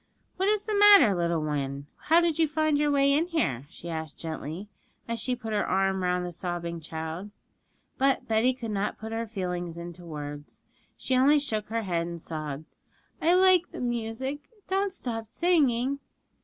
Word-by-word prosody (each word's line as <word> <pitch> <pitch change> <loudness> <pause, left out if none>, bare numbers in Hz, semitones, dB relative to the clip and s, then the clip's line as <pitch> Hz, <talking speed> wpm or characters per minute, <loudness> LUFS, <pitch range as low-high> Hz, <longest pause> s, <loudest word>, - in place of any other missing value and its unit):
'What 380 +2 +2
is 425 -1 +2
the 430 - -3
matter, 405 - +8
little 170 -3 0
one? 140 -2 -3 0.2
How 330 +2 +5
did 335 -2 0
you 320 - +4
find 310 -1 +1
your 295 0 +2
way 280 -1 +4
in 315 +4 +2
here?' 145 - -1
she 170 - -11
asked 160 -2 -5
gently, 160 +4 -6 0.4
as 230 0 -2
she 250 +2 -1
put 225 -3 -6
her 210 - +2
arm 190 0 +1
round 180 0 0
the 175 - -5
sobbing 175 -1 -4
child. 160 +4 -6 0.7
But 270 0 +2
Betty 230 +3 +3
could 230 -4 -5
not 205 0 -1
put 220 0 -7
her 225 0 -2
feelings 180 -5 -4
into 175 +1 -8
words; 145 -2 -8 0.4
she 260 - -1
only 275 +4 +5
shook 220 -8 -2
her 225 +1 -2
head 170 -3 -1
and 170 0 -6
sobbed, 155 -2 -5 0.6
'I 340 +3 +4
like 370 -2 +5
the - - -7
music; 245 +4 -3 0.2
don't 390 +1 +1
stop 225 - -5
singing.' 280 -4 +2
220 Hz, 180 wpm, -27 LUFS, 170-285 Hz, 0.7 s, matter